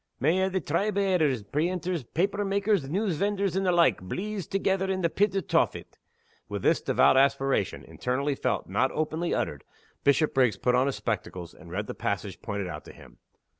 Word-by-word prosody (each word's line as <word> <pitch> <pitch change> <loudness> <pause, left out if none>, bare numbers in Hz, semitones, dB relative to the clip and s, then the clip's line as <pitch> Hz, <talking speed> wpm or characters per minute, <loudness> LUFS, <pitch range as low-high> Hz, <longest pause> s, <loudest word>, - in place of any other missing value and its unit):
"May 160 +8 +2
a' 190 - +2
the 190 0 -1
tribe 195 +5 -1
o' - - +3
editors, 155 - +2
preenters, 170 - -1
paper 195 - -1
makers, 200 -6 +1
news 190 0 0
vendors, 200 -1 0
and 190 - +1
the - - +4
like, 170 - +3
bleeze 190 - -4
together 195 -1 0
in 190 -1 -1
the 170 -2 +1
pit 200 -1 +1
o' 195 - +2
Tophet!" - - -1 0.5
With - - -4
this - - +3
devout - - +4
aspiration 135 -5 +2
internally 140 +3 -2
felt, - - -1
not 130 - +1
openly 155 +2 -1
uttered 70 -2 -2 0.4
Bishopriggs 135 - +3
put 125 - +1
on 125 +2 +3
his 140 - -1
spectacles, 90 -6 -4
and 90 -2 -14
read 100 +4 -3
the - - -5
passage 100 -2 -3
pointed 100 -3 -3
out 80 -3 -7
to - - -11
him. - - -16
155 Hz, 190 wpm, -27 LUFS, 125-190 Hz, 0.5 s, the